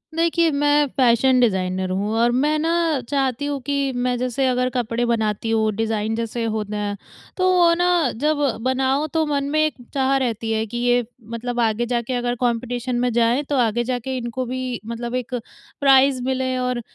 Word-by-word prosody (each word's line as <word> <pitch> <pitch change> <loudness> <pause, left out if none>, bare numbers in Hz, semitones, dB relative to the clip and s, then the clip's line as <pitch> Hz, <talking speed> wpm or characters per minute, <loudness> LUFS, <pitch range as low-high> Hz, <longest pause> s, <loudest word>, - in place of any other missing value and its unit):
देखिए, 335 0 +2
मैं 290 0 +3
fashion 255 0 +4
designer 185 -4 +1
हूँ 200 +3 -1
और 235 +1 +3
मैं 295 +5 +1
ना 325 - 0 0.4
चाहती 275 -1 0
हूँ 285 -1 -2
कि 280 -1 0
मैं 245 0 0
जैसे 255 +2 0
अगर 250 0 +1
कपड़े 240 -1 -1
बनाती 220 -1 -1
हूँ, 220 -1 +2
डिज़ाइन 220 0 -1
जैसे 230 0 -3
होते 215 -2 -3
हैं, 205 -1 -3 0.4
तो 370 0 +3
वो 345 -2 +5
ना 350 -5 +2
जब 300 +5 0 0.3
बनाओ, 265 +3 +1
तो 320 +1 0
मन 285 -2 -1
में 310 +1 +1
एक 310 - -1 0.2
चाह 270 0 +2
रहती 230 -3 -2
है 220 0 0
कि 240 +3 -6
ये 245 -1 +2 0.3
मतलब 240 +1 -3
आगे 225 0 +1
जाके 240 +1 -2
अगर 245 0 -1
कॉम्पिटिशन 245 +1 -2
में 250 0 +1
जाए, 235 +4 +2
तो 285 0 -3
आगे 240 -1 +1
जाके 255 +1 -3
इनको 245 +1 -4
भी 255 -1 -4
मतलब 235 +2 -4
एक 255 0 -3 0.4
प्राइज़ 270 -2 +4
मिले 260 0 -1
और 250 -1 -1
250 Hz, 185 wpm, -21 LUFS, 230-270 Hz, 0.4 s, वो